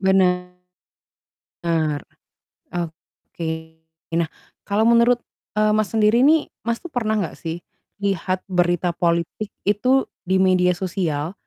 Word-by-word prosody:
Bener, 180 -1 +1 2.0
oke. 165 -1 -6 0.7
Nah, 165 -1 +1 0.4
kalau 210 +2 +2
menurut, 235 +1 +5 0.4
eee, 215 0 +4
Mas, 215 -2 +2
sendiri 220 +2 +4
nih, 310 +1 +4 0.2
Mas 235 0 0
tuh 345 - -8
pernah 220 -3 0
nggak 170 - -4
sih 165 +1 -5 0.4
lihat 185 -1 0
berita 175 -1 +2
politik 170 +4 0 0.2
itu 250 +7 +3 0.2
di 190 - +2
media 180 -1 +4
sosial, 175 -4 -2
185 Hz, 110 wpm, -22 LUFS, 175-215 Hz, 2.0 s, menurut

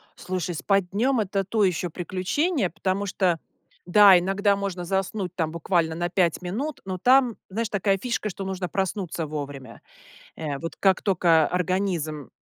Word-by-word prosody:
Слушай, 180 -1 -4
спать 195 +2 +1
днём- 245 +6 +1
это 195 0 -1
то 210 +3 0
ещё 180 -2 0
приключение, 190 - -1
потому 190 +4 -2
что, 185 -4 0 0.5
да, 195 +1 +7
иногда 195 +3 +1
можно 195 -3 -4
заснуть 190 0 -2
там 160 -3 -1
буквально 170 -1 0
на 175 +1 -2
5 175 -2 +1
минут, 245 +12 -4
но 185 -1 -3
там, 250 +3 +4
знаешь, 225 +3 -2
такая 195 -1 +1
фишка, 235 0 -2
что 195 0 -6
нужно 190 -1 -3
проснуться 190 -3 -2
вовремя, 140 -5 -7 0.5
э. 150 -3 -4
Вот 165 +4 -6
как 190 -1 +2
тока 170 -5 +3
организм, 180 -5 -2
185 Hz, 155 wpm, -25 LUFS, 170-200 Hz, 0.5 s, да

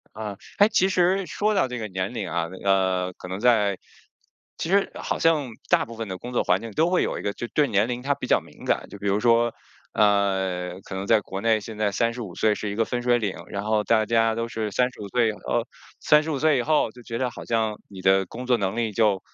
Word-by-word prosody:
啊， 105 -2 -5 0.2
哎 205 +1 +7
其 190 -3 +3
实 185 +1 +2
说 210 +4 0
到 190 - +3
这 125 -1 -5
个 110 -2 -4
年 95 +3 -3
龄 110 -5 -3
啊， 85 0 -1 0.2
呃， 95 -2 +2
可 - - -10
能 95 +2 -5
在 105 -5 +3 0.8
其 165 - -4
实 200 +1 +2
好 - - -3
像 155 -6 +2 0.2
大 - - +3
部 115 0 -10
分 115 -1 -4
的 95 - -5
工 125 - -8
作 125 - +1
环 90 0 +2
境 115 0 -7
都 160 +9 +2
会 180 0 +2
有 - - -2
一 - - -7
个 100 - -1
就 120 - -6
对 150 +3 +2
年 105 -2 +1
龄 125 0 -3
它 140 +3 0
比 - - -7
较 - - +4
敏 - - -15
感。 - - 0
就 - - -10
比 100 - -3
如 100 +1 +2
说 120 +1 +3 0.4
呃， 95 -3 +1
可 - - -8
能 95 +1 -3
在 110 -2 +5
国 95 -1 -6
内 110 0 +3
现 110 +1 -8
在 105 -1 +1
三 115 +3 0
十 125 - -5
五 95 -6 -8
岁 110 -1 +3
是 105 0 -4
一 100 - -5
个 115 - +2
分 120 +1 -3
水 120 0 +3
岭， 105 -4 -2
然 100 0 -4
后 110 0 +1
大 110 0 +2
家 115 -1 +2
都 115 0 -1
是 110 -2 -3
三 125 +4 +1
十 - - -15
五 100 - -6
岁 120 +2 +2
以 - - -3
后， 105 - -2 0.3
三 150 0 +4
十 160 - -4
五 145 - -1
岁 155 -1 +3
以 120 - +1
后 150 -5 +2
就 125 - -14
觉 115 0 -5
得 130 - 0
好 - - -9
像 110 -2 0
你 95 -2 -10
的 95 +1 +4
工 125 +7 -8
作 125 -1 +4
能 100 -1 -2
力 115 -2 -1
就， 105 -3 +2
110 Hz, 290 characters per minute, -24 LUFS, 100-125 Hz, 0.8 s, 哎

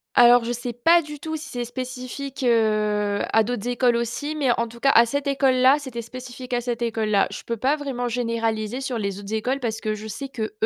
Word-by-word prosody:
Alors 240 0 +7
je 235 - -2
sais 245 0 -4
pas 330 +9 +4
du 300 -2 -9
tout 315 +2 -4
si 310 - -9
c'est 245 -1 -3
spécifique, 255 +2 -6
heu, 210 -3 +2
à 225 0 +5
d'autres 245 0 -3
écoles 245 -1 +2
aussi, 240 +6 -2
mais 280 -5 +2
en 235 - 0
tout 235 +1 -13
cas 275 +3 +4
à 235 -1 +6
cette 285 +4 -2
école-là, 270 -1 +4
c'était 250 -5 -6
spécifique 250 +1 -8
à 245 - +1
cette 240 -1 -3
école-là. 220 -3 +1
Je - - -6
peux 235 - -3
pas 270 +7 +1
vraiment 260 -4 -3
généraliser 230 -1 -1
sur 260 -4 -3
les 200 -1 -3
autres 205 +2 -7
écoles 250 +5 -1
parce 225 -3 -3
que 215 0 -1
je 215 +1 -9
sais 270 +6 -6
qu’eux, 220 -5 -4
245 Hz, 225 wpm, -23 LUFS, 225-260 Hz, -, Alors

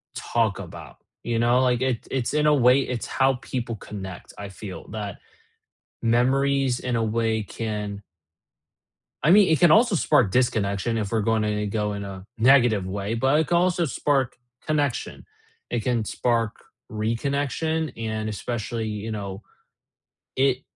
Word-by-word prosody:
talk 115 -4 0
about, 85 -7 -10 0.3
you 115 -1 -1
know, 120 +2 +3
like 125 -1 +2
it 130 -3 -1
it's 130 0 -1
in 150 0 +2
a 150 - +5
way, 130 0 +5
it's 125 -3 -3
how 135 0 +2
people 120 -1 -4
connect, 95 -3 -8
I 100 -1 -7
feel, 95 -1 -9
that, 105 -3 -5 0.8
memories 130 +2 +2
in 125 -2 -2
a 115 - +1
way 110 0 0
can 105 -2 -4 1.2
I 155 - +4
mean, 200 0 +7
it 160 - +3
can 175 - +6
also 225 +1 +5
spark 140 - +3
disconnection 115 -2 +1
if 105 0 -3
we're 110 - +2
gonna 105 -1 0
go 105 0 -1
in 100 0 -5
a 95 0 -8
negative 120 -6 +4
way, 100 +3 -3
but 135 +6 +3
it 160 - 0
can 175 - +2
also 175 -1 +2
spark 135 -3 0 0.3
connection, 145 -4 -1 0.5
it 115 - -1
can 120 -2 0
spark 115 -1 0 0.3
reconnection 140 +8 -1
and 110 -1 -3
especially, 110 +1 -3
you 105 +1 -4
know, 100 -1 -5 0.9
it 135 0 +2
115 Hz, 150 wpm, -24 LUFS, 105-135 Hz, 1.2 s, mean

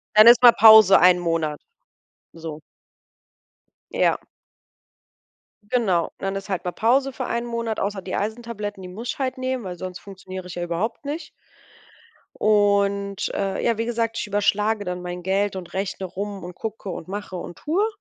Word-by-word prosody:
Dann 215 +1 +8
ist 240 0 +8
mal 240 - +11
Pause 220 -3 +8
1 180 0 +6
Monat, 165 -3 -1 0.7
so. 160 -2 -8 1.3
Ja. - - +2 1.5
Genau, 190 -9 +1
dann 195 0 -3
ist 195 +1 -6
halt 190 -2 -3
mal 180 - -1
Pause 260 +6 +1
für 255 - -4
1 235 0 -2
Monat, 230 -2 -3
außer 200 0 -2
die 185 0 -5
Eisentabletten, 210 -2 -4
die 180 - -8
muss 225 +6 -7
ich - - -4
halt 260 -1 -2
nehmen, 255 -1 -3
weil 180 -2 -6
sonst 185 0 -7
funktioniere 190 -1 -9
ich 180 - -8
ja 175 - -3
überhaupt 200 - -3
nicht. 300 +4 -5 1.1
Und, 200 -1 +2
äh, 195 -1 -2
ja, 235 -2 +1
wie 230 - -1
gesagt, 230 -1 -2
ich - - -2
überschlage 205 +1 +1
dann 180 0 -4
mein 180 0 -6
Geld 195 +2 0
und 185 -2 -8
rechne 190 0 -3
rum 200 +2 -6
und 175 0 -8
gucke 215 -2 -6
und 170 - -6
mache 200 0 -6
und 175 -1 -8
tue. 365 +8 0
200 Hz, 170 wpm, -23 LUFS, 185-225 Hz, 1.5 s, mal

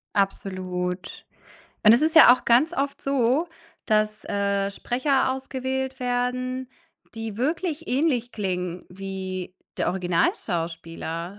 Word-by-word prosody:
Absolut, 185 -2 -2 0.6
und 215 - +9
es 245 - +3
ist 315 +1 +2
ja 315 -6 +10
auch 250 - -1
ganz 255 +8 +4
oft 280 -1 -2
so, 275 +4 +1 0.4
dass, 215 -1 +1
äh, 200 -1 0
Sprecher 260 +5 +1
ausgewählt 265 0 -3
werden, 250 +1 -1 0.5
die 225 -2 -5
wirklich 320 +4 -2
ähnlich 255 -3 +1
klingen 180 -4 -3
wie 185 -1 -6 0.2
der - - +1
Originalschauspieler. 170 0 -2
225 Hz, 110 wpm, -25 LUFS, 185-260 Hz, 0.6 s, ja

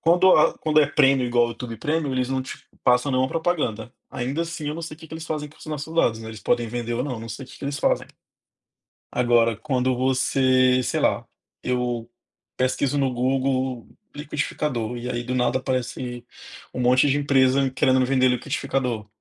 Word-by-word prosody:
Quando 175 +3 +5
a 155 - +3
quando 155 -1 +3
é 145 - +4
Premium 135 -3 +3
igual 120 0 +3
ao 120 - -2
YouTube 115 0 -7
Premium, 150 +2 -1
eles 130 -1 0
não 130 0 -1
te 130 - -8 0.3
passam 125 +3 +3
nenhuma 130 0 +2
propaganda. 140 -9 -1 0.2
Ainda 135 +6 -2
assim, 170 -3 -5
eu 150 - -3
não 165 - -6
sei 160 -1 -6
o - - -29
que 160 - -12
que 160 - -9
eles 160 0 -6
fazem 150 -2 -3
com 150 - -20
os - - -13
nossos 155 +1 -5
dados, 115 -9 +2
né? 110 - -8
Eles 110 -2 -9
podem 120 +3 +1
vender 120 0 -3
ou 125 +3 -1
não, 125 -5 -4
não 115 - -8
sei 115 +5 -6
o - - -18
que - - -12
que - - -8
eles 140 0 -3
fazem. - - +1 1.1
Agora, 120 -2 +3
quando 130 -2 0
você, 130 0 +3
sei - - -1
lá, - - +1 0.4
eu 120 -2 -2 0.5
pesquiso 130 +2 0
no 135 -2 +1
Google 130 -1 0 0.3
“liquidificador” 145 -5 -3
e 120 +1 -5
aí, 120 -1 -2
do 125 +1 -3
nada, 125 0 +1
aparece 125 -1 -3 0.5
um - - -4
monte 125 +3 +4
de 140 +1 +2
empresa 135 -1 +3
querendo 130 -1 +2
me 130 - +2
vender 130 -1 +3
liquidificador. 125 -2 -1
130 Hz, 205 wpm, -24 LUFS, 120-145 Hz, 1.1 s, Quando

